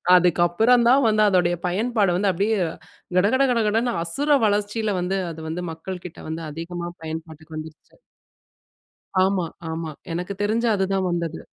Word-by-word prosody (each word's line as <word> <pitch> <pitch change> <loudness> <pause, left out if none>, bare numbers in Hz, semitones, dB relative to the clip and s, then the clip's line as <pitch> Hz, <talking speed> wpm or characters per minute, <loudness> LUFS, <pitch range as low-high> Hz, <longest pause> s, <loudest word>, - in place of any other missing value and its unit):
அதுக்கப்பறம் 180 +7 +4
தான் 270 +2 +5
வந்து 215 -1 +3
அதோடைய 175 -2 +2
பயன்பாடு 205 0 +1
வந்து 200 +1 +2
அப்பிடியே 205 +5 +1 0.6
கடகட 215 +9 +4
கடகடன்னு 230 +1 +1
அசுர 285 - +2
வளர்ச்சில 210 +1 0
வந்து 185 +2 -1
அது 160 0 -9
வந்து 170 +3 -3
மக்கள்க்கிட்ட 180 +1 -8
வந்து 160 +1 -4
அதிகமா 170 +2 -5 0.2
பயன்பாட்டுக்கு 160 0 -7
வந்துருச்சு. 155 0 -10 1.3
ஆமா, 190 -2 +1 0.3
ஆமா. 160 -1 -4 0.2
எனக்கு 180 +4 -3
தெரிஞ்சு 225 +3 +1
அதுதான் 190 -1 0
வந்தது. 170 -2 -2
185 Hz, 130 wpm, -23 LUFS, 170-215 Hz, 1.3 s, தான்